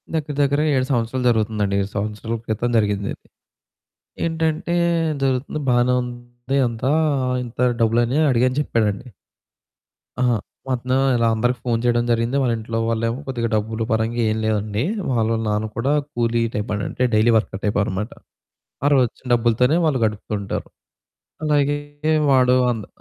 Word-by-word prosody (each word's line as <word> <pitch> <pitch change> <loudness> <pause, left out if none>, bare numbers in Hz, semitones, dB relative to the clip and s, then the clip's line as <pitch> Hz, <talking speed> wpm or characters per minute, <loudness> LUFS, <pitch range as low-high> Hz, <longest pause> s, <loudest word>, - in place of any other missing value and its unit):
దగ్గర 155 -2 -2
దగ్గరగ 145 +2 +2
7 130 -1 +1
సంవత్సరాలు 125 +1 0
జరుగుతుందండి. 110 -3 0
7 100 - -3
సంవత్సరాల 105 +2 -3
క్రితం 110 +2 -1
జరిగిందిది. 100 -2 0 1.1
ఏంటంటే 165 +1 -1 0.5
జరుగుతుంది 135 +3 -1
బానే 125 0 +3
ఉంది 120 +2 -5
అంతా 115 +3 -2 0.5
"ఇంత 120 0 -11 0.2
డబ్బులని 120 +4 +2
అడిగాను" 130 +1 +2
చెప్పాడండి. 110 -5 -1 1.1
ఆ! - - +2 0.5
వస్తనాం 130 +1 0 0.2
ఇలా 115 -1 +2
అందరికి 120 +2 0
ఫోను 115 -2 +1
చేయడం 120 -1 +2
జరిగింది. 115 +3 +1
వాళ్ళ 125 -3 +1
ఇంట్లో 115 +1 -4
వాళ్ళేమో 115 +2 -1
కొద్దిగా 120 -3 -1
డబ్బులు 110 +1 -1
పరంగా 115 +2 0
ఎం 110 - -1
లేదండి. 105 0 -1 0.3
వాళ్ళ 115 -2 +1
నాన్న 105 +1 0
కూడా 135 +5 +1 0.2
కూలీ 115 0 +1
టైప్ 105 +2 -2 0.2
అంటే 125 - -1
డైలీ 110 +2 +4
వర్కర్ 100 -2 -3
టైప్ 105 0 0
అనమాట. 100 +3 -3 0.7
ఆ - - +4
రోజు 130 -2 +5
వచ్చిన 130 - -22
డబ్బులతోనే 120 +5 +2
వాళ్ళు 140 -5 +1
గడుపుతుంటారు. 105 -1 -3 0.8
అలాగే 145 -1 +2 0.5
వాడు 130 -1 +5 0.2
అంద్ 110 -4 -5
120 Hz, 135 wpm, -21 LUFS, 110-130 Hz, 1.1 s, రోజు